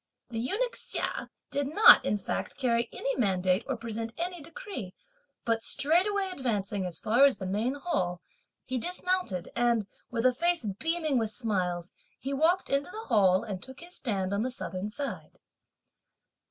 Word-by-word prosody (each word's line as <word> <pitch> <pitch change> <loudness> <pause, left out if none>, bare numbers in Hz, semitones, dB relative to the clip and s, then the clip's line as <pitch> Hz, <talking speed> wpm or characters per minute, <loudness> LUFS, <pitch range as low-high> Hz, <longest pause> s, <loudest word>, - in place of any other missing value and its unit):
The 225 - -3
eunuch 470 - -1
Hsia - - -4 0.2
did 285 -1 0
not, 430 +11 +8
in 210 - +1
fact, 200 - -4
carry 235 -4 +1
any 275 - -2
mandate 190 -3 +2
or 265 -3 -1
present 230 0 -5
any 350 0 -3
decree; 330 - -8 0.5
but 230 -1 +1
straightway 375 - +2
advancing 205 - -2
as 170 -3 -2
far 235 +5 +4
as 280 -2 +6
the 190 - -5
main 215 +8 0
hall, 185 - -1 0.5
he 255 -1 -1
dismounted, 360 - -1
and, 235 -3 +2 0.2
with 235 0 -2
a 255 - +6
face 340 0 +1
beaming 320 -4 +1
with 220 -1 -1
smiles, 185 -6 -1 0.3
he 275 +1 -3
walked 330 +6 +2
into 275 +3 +1
the 440 +4 -8
Hall 190 -5 +4
and 200 -5 -5
took 265 +5 -10
his 350 +1 -6
stand 195 -6 -1
on 200 - +1
the 250 - 0
southern 205 -5 -4
side. 275 +5 -6
245 Hz, 165 wpm, -29 LUFS, 205-325 Hz, 0.5 s, not